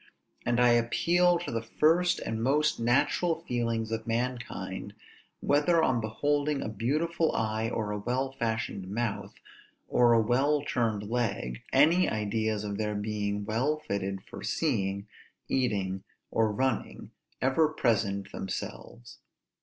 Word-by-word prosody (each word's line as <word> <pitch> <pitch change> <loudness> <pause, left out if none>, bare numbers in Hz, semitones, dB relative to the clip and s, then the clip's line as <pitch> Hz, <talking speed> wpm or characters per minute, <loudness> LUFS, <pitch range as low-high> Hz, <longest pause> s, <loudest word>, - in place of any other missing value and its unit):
And 120 0 +2
I 125 0 +6
appeal 170 +10 +3
to 175 - -5
the 115 -1 -1
first 165 +10 +2
and 110 0 -3
most 145 +4 +2
natural 150 +8 +2
feelings 115 -2 -1
of 115 0 -3
mankind, 120 +1 -3 0.5
whether 155 +4 +3
on 120 -6 +2
beholding 145 +6 0
a - - -3
beautiful 155 +10 0
eye, 110 0 0
or 110 -3 -2
a 105 - -2
well 125 +5 -1
fashioned 110 -6 -3
mouth, 115 +1 -3 0.5
or 120 -1 +4
a 115 - +5
well 135 +6 +2
turned 115 -7 0
leg, 105 - -2
any 160 +7 +5
ideas 110 0 -1
of 100 0 -4
their 105 -1 -1
being 105 -1 -2
well 125 +8 0
fitted 100 -9 -3
for - - -9
seeing, 100 +1 -1 0.4
eating, 100 -7 0 0.3
or 110 -1 +2
running, 130 +5 -2 0.3
ever 135 +5 +3
present 110 -9 0
themselves. 95 -9 -7
115 Hz, 130 wpm, -29 LUFS, 105-140 Hz, 0.5 s, I